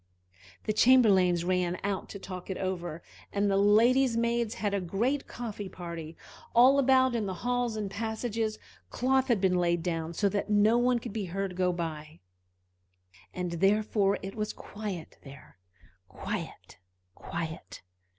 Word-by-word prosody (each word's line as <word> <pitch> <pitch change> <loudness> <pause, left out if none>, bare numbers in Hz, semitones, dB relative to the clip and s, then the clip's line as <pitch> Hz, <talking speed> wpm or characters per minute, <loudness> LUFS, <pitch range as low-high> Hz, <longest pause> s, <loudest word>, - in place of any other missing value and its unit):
The 215 - -1
chamberlains 195 -8 +5
ran 180 -1 0
out 200 -1 -2
to - - -7
talk 185 -1 -8
it 190 - -3
over, 175 -3 -4 0.3
and 200 0 +1
the - - +2
ladies' 230 +5 +4
maids 235 -1 0
had 205 -2 -2
a 200 - 0
great 230 +11 -1
coffee 210 -5 -6
party. 170 -3 -8 0.4
All 260 +4 +7
about, 260 -1 +4
in 225 -3 -1
all - - -3
the - - -12
halls 245 -2 0
and 210 -3 -4
passages, 220 +1 -2 0.3
cloth 265 +1 +1
had 235 -5 +2
been 185 -1 +2
laid 170 -1 +1
down 165 -1 -3
so 205 - +2
that 200 +1 -2
no 215 +3 +4
one 245 0 +3
could 225 - -7
be 215 -3 -3
heard 190 +1 -3
go 180 0 +1
by, 160 -3 -5 1.1
and 180 -1 -4
therefore 200 +2 +2
it 195 +1 -5
was 215 -1 -3
quiet 205 -6 -7
there, 135 -8 -14 0.5
quite - - -7 0.3
quiet. 160 - -7
200 Hz, 155 wpm, -29 LUFS, 180-230 Hz, 1.1 s, All